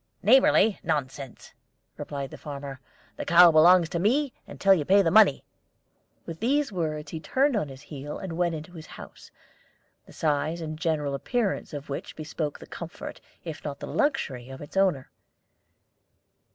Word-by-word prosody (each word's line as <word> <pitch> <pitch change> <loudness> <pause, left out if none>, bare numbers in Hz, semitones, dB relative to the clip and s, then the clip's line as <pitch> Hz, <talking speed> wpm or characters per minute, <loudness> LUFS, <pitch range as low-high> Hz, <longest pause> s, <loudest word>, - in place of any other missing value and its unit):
"Neighborly 220 -2 +5
nonsense!" 135 -2 -4 0.4
replied 140 -2 -6
the - - -9
farmer. 140 -2 -7 0.4
"The - - -4
cow 175 0 +7
belongs 170 +2 +6
to 170 - -2
me 255 - +1
until 195 -1 +3
you 170 -6 +1
pay 195 +6 +4
the 165 - +1
money." 215 -10 +5 0.8
With 165 -1 -7
these 275 +3 +1
words 155 -5 -3
he 160 - -5
turned 270 - +1
on 200 -8 0
his 135 +1 -11
heel 145 0 -7
and 190 -3 -6
went 170 0 0
into 155 +2 -8
his 160 -3 -10
house, - - -12 0.8
the - - -15
size 155 +2 -1
and 155 -1 -5
general 155 -4 -1
appearance 215 - -2
of 145 -2 -7
which 140 - -6
bespoke 155 -1 -4
the - - -12
comfort, 170 0 -8 0.2
if 160 -3 -7
not 140 -2 -5
the - - -6
luxury, 140 - -1
of 135 - -9
its 145 - -11
owner. 185 -9 +1
160 Hz, 165 wpm, -26 LUFS, 145-195 Hz, 0.8 s, cow